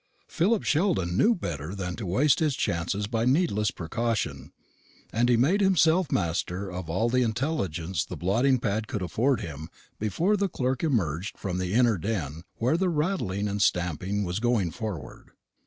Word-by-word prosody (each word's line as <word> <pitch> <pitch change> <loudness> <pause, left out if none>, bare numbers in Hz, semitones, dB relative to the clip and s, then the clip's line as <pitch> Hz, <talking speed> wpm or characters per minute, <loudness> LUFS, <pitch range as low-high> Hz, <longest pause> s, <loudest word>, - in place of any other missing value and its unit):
Philip 200 +5 +1
Sheldon 150 - +1
knew 225 - +4
better 85 - -5
than 90 -2 -4
to 105 - -5
waste 130 +10 +3
his 150 -4 +1
chances 85 +3 -1
by 115 +1 -1
needless 125 - +2
precaution; 85 - -3 0.6
and 120 +2 +2
he 120 - +5
made 165 - +3
himself 180 -3 +3
master 90 +2 -1
of 90 -2 -6
all 95 +8 +1
the 125 +2 +2
intelligence 110 - -1
the - - -7
blotting 120 +9 +2
pad 110 -2 -2
could 105 -7 -3
afford 115 - +1
him 80 0 -7 0.3
before 165 - +1
the 200 -1 0
clerk 130 -3 -1
emerged 100 - -1
from 90 -2 -3
the 90 +1 -2
inner 120 -5 +4
den 80 -6 -3
where 130 +8 +1
the 185 +1 +1
rattling 150 - -1
and 100 0 -2
stamping 90 +3 0
was 90 +1 -2
going 115 -7 +1
forward. 85 - -7
110 Hz, 165 wpm, -27 LUFS, 90-135 Hz, 0.6 s, he